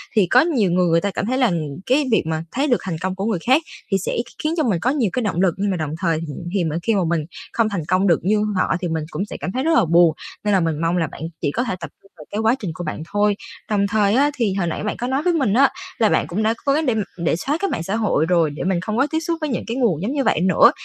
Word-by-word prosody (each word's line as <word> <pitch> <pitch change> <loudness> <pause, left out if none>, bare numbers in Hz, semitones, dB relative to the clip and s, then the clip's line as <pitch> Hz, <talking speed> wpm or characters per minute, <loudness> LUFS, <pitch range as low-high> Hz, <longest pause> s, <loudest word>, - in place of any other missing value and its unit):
thì 195 -5 +4
có 250 +6 +6
nhiều 245 - +1
người 180 0 +2
người 165 0 +3
ta 200 - -1
cảm 195 - -3
thấy 255 +4 0
là, 250 -3 +4
ừm, 170 -4 0 0.3
cái 275 +3 +2
việc 220 - +3
mà 160 0 -2
thấy 280 +4 0
được 245 - +3
thành 180 -4 -3
công 185 0 -2
của 195 - -3
người 215 -6 0
khác 260 - +3 0.3
thì 195 - +4
sẽ 190 - -3
kh - - -15
khiến 310 +1 0
cho 310 - +2
mình 200 -9 +1
có 245 - +1
nhiều 260 -8 +1
cái 250 - -1
động 185 -4 0
lực 180 -4 +3
nhưng 200 0 0
mà 180 - -1
đồng 155 -2 -3
thời 165 -4 +1 0.3
thì 190 -4 +1
mình 160 +1 -1
khi 225 -2 +2
mà 195 - +2
mình 170 -2 +1 0.3
không 225 -2 +2
thành 175 -7 -3
công 190 +2 +2
được 170 - +4
như 210 +2 +2
họ 185 - +1
thì 175 - -1
mình 160 -1 -2
cũng 195 - -2
sẽ - - -7
cảm 185 - -4
thấy 260 +4 -2
rất 325 +1 +2
là 215 - +4
buồn, 170 -1 +4 0.3
nên 210 -1 +1
là 190 - +4
mình 165 -2 -1
mong 165 +2 +1
là 165 -3 +1
bạn - - -11 0.2
chỉ 145 - 0
có 245 - -1
thể 190 - -2
tập 170 - -6
trung 195 - -24
vào 150 - -12
cái 210 - -2
quá 225 +2 +3
trình 190 -6 -4
của 175 - -6
bạn 155 -1 -4
thôi. 205 0 +2 0.3
Đồng 200 -1 +2
thời 205 0 +2
á, 290 +2 +3
thì 220 -6 0
hồi 190 -3 -1
nãy 160 - -3
bạn 210 - -2
có 245 - -3
nói 270 +3 0
với 355 - +2
mình 265 -11 +1
á 275 +3 +5 0.3
là 220 -3 +3
bạn - - +1
cũng 180 +7 -2
đã 220 +1 +2
cố 275 - +3
gắng 310 +1 +1
để 245 -4 +1
m 215 - +1 0.2
để 170 -2 0
xóa 280 - -1
cái 395 +1 -1
mạng 165 - -2
xã 195 +5 -2
hội 205 -8 +1
rồi 170 -2 +2
để 145 - -6
mình 185 -2 +1
không 215 +4 -3
có 275 +3 +3
tiếp 320 - +1
xúc 335 0 -2
với 310 - -1
những 240 - -2
cái 235 +2 -3
nguồn 205 - +1
giống 215 - -2
như 275 -2 0
vậy - - +2
nữa. 185 0 +6
200 Hz, 330 wpm, -21 LUFS, 170-245 Hz, 0.3 s, có